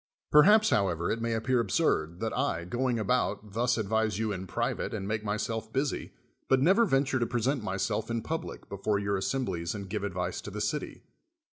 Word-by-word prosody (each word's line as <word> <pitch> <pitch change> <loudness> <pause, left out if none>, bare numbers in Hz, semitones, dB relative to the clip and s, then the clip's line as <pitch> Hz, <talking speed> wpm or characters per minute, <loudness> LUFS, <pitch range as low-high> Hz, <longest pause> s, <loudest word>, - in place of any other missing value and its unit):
Perhaps, 210 +9 +7
however, 85 -4 +1
it 115 - -2
may 115 0 0
appear 120 +3 +1
absurd, 95 - 0
that 115 - -2
I, 125 -11 -1
going 120 +5 0
about, 105 -3 0
thus 120 +2 +1
advise 110 -1 0
you 110 -1 -1
in 95 -1 -5
private - - -2
and 100 -2 -4
make 110 0 -2
myself 110 +1 -2
busy, 135 +3 -1 0.4
but 135 - +5
never 190 - +5
venture 135 -3 +2
to 120 - 0
present 125 +1 0
myself 105 +2 -2
in 115 -1 -2
public 160 +1 -5
before 100 +1 -1
your 100 0 0
assemblies 95 -5 -2
and 100 -1 -6
give 105 -1 -2
advice 90 -2 -3
to - - -7
the 105 +1 -6
city. 110 +9 -3
110 Hz, 185 wpm, -29 LUFS, 100-130 Hz, 0.4 s, Perhaps